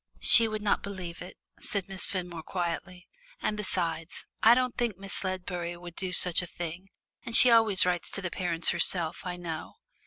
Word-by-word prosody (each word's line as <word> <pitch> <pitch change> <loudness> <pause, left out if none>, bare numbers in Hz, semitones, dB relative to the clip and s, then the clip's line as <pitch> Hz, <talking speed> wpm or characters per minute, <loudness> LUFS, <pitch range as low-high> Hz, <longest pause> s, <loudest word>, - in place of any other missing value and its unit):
"She 230 -1 +7
would 215 -1 -5
not 205 - 0
believe 185 -4 -8
it," 180 +1 -11 0.2
said 200 -3 0
Miss 195 -1 -2
Fenmore 180 -4 -6
quietly; 180 +2 -6 0.3
"and 210 - -2
besides, 170 -5 -4 0.2
I 230 +2 +6
don't 255 -1 -1
think 235 -6 -3
Miss 195 0 -6
Ledbury 180 -2 -5
would 175 -1 -12
do 185 -1 -4
such 180 -1 +4
a 175 - -8
thing, 175 +3 -8 0.4
and 230 - -1
she 250 - +10
always 225 -5 +6
writes 180 -1 -2
to 195 - -3
the 180 - -4
parents 170 -2 -1
herself, 170 -1 -1
I 180 - -4
know. 165 -3 -8
180 Hz, 185 wpm, -27 LUFS, 175-200 Hz, 0.4 s, she